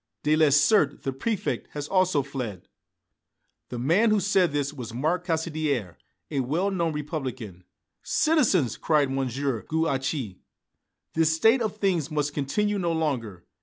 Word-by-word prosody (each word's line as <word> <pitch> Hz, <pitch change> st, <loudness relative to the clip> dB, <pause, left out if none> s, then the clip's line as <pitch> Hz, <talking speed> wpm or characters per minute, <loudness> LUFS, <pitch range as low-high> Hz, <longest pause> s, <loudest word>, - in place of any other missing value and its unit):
Delessert, 150 Hz, +1 st, +3 dB
the 135 Hz, -, -2 dB
Préfect, 205 Hz, -, -2 dB
has 145 Hz, -1 st, -4 dB
also 185 Hz, -6 st, +2 dB
fled!" 125 Hz, -9 st, -6 dB, 1.0 s
The 125 Hz, -, -5 dB
man 170 Hz, -, +3 dB
who 215 Hz, -1 st, +3 dB
said 190 Hz, -3 st, +2 dB
this 145 Hz, 0 st, -1 dB
was 120 Hz, -5 st, -7 dB
Marc 165 Hz, +7 st, -1 dB
Caussidière, 155 Hz, -, -1 dB, 0.4 s
a 140 Hz, -, -1 dB
well 160 Hz, +10 st, 0 dB
known 170 Hz, -4 st, 0 dB
Republican. 130 Hz, -, -5 dB, 0.4 s
"Citizens!" 210 Hz, -, +2 dB
cried 145 Hz, -4 st, +1 dB
M. 135 Hz, -1 st, 0 dB
Gouache, 135 Hz, -, -2 dB, 0.7 s
"this 160 Hz, 0 st, +2 dB
state 225 Hz, +9 st, +4 dB
of 215 Hz, -2 st, -2 dB
things 180 Hz, -7 st, 0 dB
must 150 Hz, -2 st, -1 dB
continue 205 Hz, +9 st, -1 dB
no 170 Hz, -2 st, 0 dB
longer. 120 Hz, -, -2 dB
150 Hz, 130 wpm, -26 LUFS, 135-175 Hz, 1.0 s, state